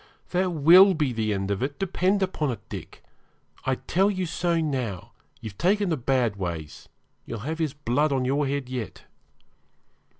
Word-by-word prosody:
That 185 +1 +1
will 175 +5 +7
be 150 -5 0
the 110 -2 -1
end 95 0 -2
of 100 - -2
it, 140 +2 -2
depend 195 +1 +1
upon 160 -6 -1
it, 120 - -6
Dick. - - -9 0.6
I 130 - +2
tell 190 +9 +1
you 185 -2 -2
so 170 0 0
now; 130 - -3 0.3
you've 105 -3 -9
taken 200 - +2
to 160 - +1
bad 125 -4 0
ways; 85 -5 -6 0.3
you'll 115 -3 -6
have 160 +2 -3
his 155 -3 -1
blood 145 +2 0
on 130 -2 0
your 140 +2 +1
head 140 -1 -2
yet.' 125 -3 -6
140 Hz, 170 wpm, -25 LUFS, 120-175 Hz, 0.6 s, will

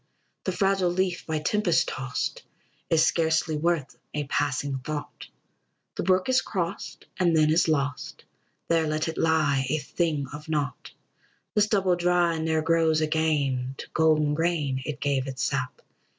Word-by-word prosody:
The - - 0
fragile 195 -2 +1
leaf, 180 0 -1
by 160 -1 -1
tempest 175 +2 +1
tost, 130 -1 -3 0.5
Is 160 -1 +4
scarcely 160 -1 +1
worth 155 -2 -1 0.2
a 150 - -1
passing 140 -1 -1
thought; 150 +3 -6 0.7
The - - -3
brook 185 0 +2
is 260 0 +3
crossed, 185 -1 -4
and 170 -3 +3
then 155 0 +4
is 165 +2 +3
lost; 140 -3 -2 0.4
There 165 -1 +2
let 155 +1 -1
it 160 - -4
lie, 150 -5 +2
a 155 - +1
thing 150 0 -1
of 150 +2 -9
naught. 145 -5 -2 0.6
The 210 - +3
stubble 195 -3 +2
dry 175 -1 +2
ne'er 160 0 0
grows 165 -1 +3
again; 145 -5 0
To - - -7
golden 155 -2 +3
grain 150 -5 0
it 150 -2 -4
gave 140 -2 0
its 130 -1 -4
sap. 130 -2 -2
160 Hz, 150 wpm, -26 LUFS, 145-170 Hz, 0.7 s, Is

